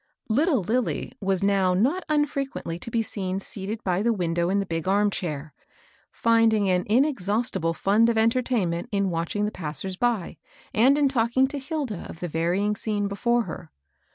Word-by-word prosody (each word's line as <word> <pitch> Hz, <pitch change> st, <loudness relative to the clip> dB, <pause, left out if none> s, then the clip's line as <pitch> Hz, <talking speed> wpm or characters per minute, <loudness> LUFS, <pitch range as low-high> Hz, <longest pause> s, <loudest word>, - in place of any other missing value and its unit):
Little 275 Hz, -, +2 dB
Lilly 235 Hz, +6 st, -1 dB
was 195 Hz, -1 st, 0 dB
now 195 Hz, -2 st, +3 dB
not 275 Hz, -, +1 dB
unfrequently 275 Hz, -, -1 dB
to 230 Hz, -, -7 dB
be 230 Hz, 0 st, 0 dB
seen 190 Hz, -3 st, -3 dB
seated 205 Hz, +3 st, -5 dB
by 180 Hz, 0 st, 0 dB
the 235 Hz, +2 st, +2 dB
window 175 Hz, -4 st, 0 dB
in 200 Hz, +1 st, +2 dB
the 200 Hz, -, -1 dB
big 165 Hz, -1 st, -3 dB
arm 205 Hz, +2 st, +3 dB
chair, 155 Hz, -5 st, -4 dB, 0.6 s
finding 225 Hz, -3 st, +3 dB
an 180 Hz, 0 st, +1 dB
inexhaustible 210 Hz, -, +1 dB
fiind 215 Hz, +6 st, +3 dB
of 230 Hz, -, +1 dB
entertainment 220 Hz, -7 st, +1 dB
in 200 Hz, -2 st, 0 dB
watch 165 Hz, +2 st, -3 dB
ing 205 Hz, 0 st, +1 dB
the 210 Hz, -, -2 dB
passers 175 Hz, +3 st, -3 dB
by, 235 Hz, -6 st, -1 dB, 0.4 s
and 260 Hz, +6 st, +5 dB
in 290 Hz, -1 st, +4 dB
talking 260 Hz, 0 st, +2 dB
to 285 Hz, -, -4 dB
Hilda 270 Hz, -, -4 dB
of 160 Hz, -, -9 dB
the 180 Hz, -, -3 dB
varying 175 Hz, +6 st, 0 dB
scene 205 Hz, -1 st, -2 dB
before 235 Hz, +4 st, +1 dB
her. 165 Hz, -, -8 dB
205 Hz, 175 wpm, -25 LUFS, 180-235 Hz, 0.6 s, and